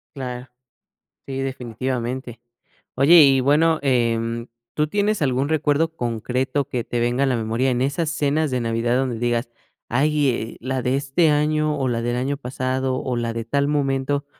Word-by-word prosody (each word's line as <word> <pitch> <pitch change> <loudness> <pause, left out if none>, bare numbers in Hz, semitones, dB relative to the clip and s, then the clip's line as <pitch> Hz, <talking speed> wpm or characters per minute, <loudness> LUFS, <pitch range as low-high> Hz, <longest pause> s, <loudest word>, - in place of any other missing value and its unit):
Claro, 125 -2 -6 0.8
sí, 135 -1 -3
definitivamente. 125 -1 -4 0.5
Oye, 160 +6 +7
y 135 -2 +6
bueno, 155 +5 +3
em, 115 -2 0 0.3
¿tú 150 0 +1
tienes 205 +2 0
algún 135 -1 +1
recuerdo 155 +1 +1
concreto 125 +3 -1
que 120 -2 -3
te 120 - -3
venga 120 +3 +1
a - - 0
la 130 - +1
memoria 115 +3 0
en 125 0 0
esas 145 +4 -1
cenas 155 -1 0
de 125 - 0
Navidad 115 +1 0
donde 130 -3 -1
digas: 120 0 -1 0.4
"Ay, 145 +3 +2
eh, 115 -2 -3
la 130 +1 -2
de 125 +2 0
este 140 +4 +2
año 150 0 +1
o 135 -2 -1
la 115 -1 -1
del 120 +1 -1
año 130 +3 -1
pasado 130 0 -2
o 130 -1 -2
la 115 -1 -2
de 115 0 -4
tal 140 +4 0
momento 140 -1 0
130 Hz, 170 wpm, -22 LUFS, 120-145 Hz, 0.8 s, Oye